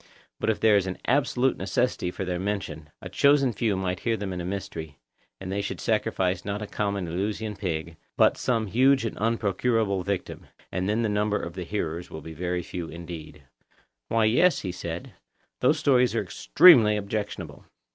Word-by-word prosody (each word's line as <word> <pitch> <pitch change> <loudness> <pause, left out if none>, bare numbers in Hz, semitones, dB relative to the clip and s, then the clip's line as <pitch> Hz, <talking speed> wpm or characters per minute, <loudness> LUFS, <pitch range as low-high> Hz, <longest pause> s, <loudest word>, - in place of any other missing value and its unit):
But - - 0
if 110 - +1
there 110 -2 +5
is 95 -1 0
an 95 - -4
absolute 135 -2 +2
necessity 125 -7 -1
for 95 +2 -5
their 90 -1 -2
mention, 95 -6 -4
a - - -5
chosen 140 -3 +3
few 105 -1 0
might 90 -1 -2
hear 115 -1 0
them 100 -3 -4
in 90 - -4
a - - -5
mystery, 80 -6 -5 0.4
and 95 -1 -6
they 100 +1 -1
should 100 - -4
sacrifice 95 -5 0
not 100 +1 -3
a 105 - -4
common 100 -3 -2
(Eleusinian) 105 +5 -3
pig, 85 -4 -4 0.2
but - - +5
some 115 -3 0
huge 130 +5 +3
and 115 - -3
unprocurable 110 -2 +1
victim; 100 0 -4 0.2
and 95 +2 -1
then 110 +3 +1
the - - +1
number 105 0 0
of 85 - -6
the 90 -1 -6
hearers 85 -3 -3
will 80 - -8
be 80 - -8
very 90 +2 -2
few 85 0 -6
indeed. 85 -1 -9 0.6
Why, 115 -1 +2
yes, 140 - +3
said 85 0 -5
he, - - -22 0.5
those - - +3
stories 125 -3 +3
are - - +1
extremely 105 - +6
objectionable. 105 0 -5
100 Hz, 185 wpm, -26 LUFS, 90-110 Hz, 0.6 s, extremely